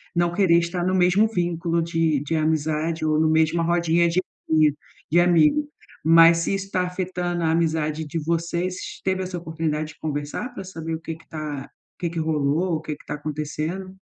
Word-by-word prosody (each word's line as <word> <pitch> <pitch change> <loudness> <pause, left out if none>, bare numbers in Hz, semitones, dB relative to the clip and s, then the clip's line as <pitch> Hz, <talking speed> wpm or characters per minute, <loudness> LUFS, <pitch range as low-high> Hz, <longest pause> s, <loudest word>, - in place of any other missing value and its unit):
não 175 0 +2
querer 175 -3 +4
estar 175 +1 -2
no 185 - +1
mesmo 185 +4 +4
vínculo 170 -2 0
de 165 -3 +1
de 150 +3 -2
amizade, 155 +1 0
ou 155 0 +2
no 160 0 +3
mesma 160 +1 +2
rodinha 170 0 +2
de 180 +2 +1 0.9
de 175 - +5
amigo. 175 - +4 0.4
Mas 165 +1 +7
se 165 - -1
isso 195 0 -3
está 185 -2 0
afetando 180 -1 -3
a 160 - +2
amizade 160 -1 0
de 155 +3 -3
vocês, 170 +3 -1 0.3
teve 190 0 0
essa 180 -1 -5
oportunidade 160 -2 -3
de - - -29
conversar? 150 - -4
Pra 195 - -7
saber 165 -3 -5
o - - -6
que 165 0 -5
que 165 - -20
tá 150 -3 -5 0.3
o - - -71
que 170 - -1
que 170 - -4
rolou, 160 +2 +1
o 155 - -3
que 155 -2 -5
que - - -20
tá - - -4
acontecendo? 155 +5 -4
165 Hz, 190 wpm, -23 LUFS, 155-175 Hz, 0.9 s, Mas